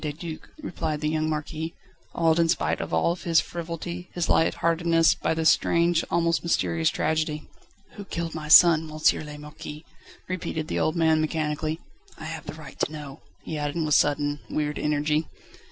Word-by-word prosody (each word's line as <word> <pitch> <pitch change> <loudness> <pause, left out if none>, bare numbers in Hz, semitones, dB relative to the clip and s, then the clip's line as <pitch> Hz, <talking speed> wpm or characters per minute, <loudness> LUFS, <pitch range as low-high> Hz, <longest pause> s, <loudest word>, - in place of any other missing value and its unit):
de 150 - -2
Duc," 160 +1 -8
replied 155 - -3
the 150 - -1
young 155 0 0
Marquis, 155 +1 -4 0.4
awed 165 -1 +3
in 165 -1 +3
spite - - 0
of - - -5
all 80 - +2
his 165 -2 +2
frivolity, 170 +1 -5
his 175 -2 -1
light 160 - +3
heartedness, 165 0 +3
by 160 - -1
this 160 0 +5
strange, 170 0 +2
almost 170 0 +1
mysterious 85 - +1
tragedy. 155 -1 -1 0.5
"Who 200 - -7
killed 170 -3 -4
my 155 -1 -6
son, 160 0 +7
M. 155 0 -8 0.3
le 150 0 -8
Marquis?" 150 +1 -9 0.4
repeated 165 -3 -4
the - - -1
old 155 - +1
man 160 -2 +3
mechanically. 155 0 -2 0.4
"I - - -10
have - - -6
the - - -6
right - - -12
to - - 0
know," 150 -3 -8 0.2
he 155 - -4
added 145 -1 -2
with 150 - +1
sudden, 145 0 +2
weird 150 -1 -2
energy. 150 +1 0
160 Hz, 175 wpm, -25 LUFS, 150-165 Hz, 0.5 s, son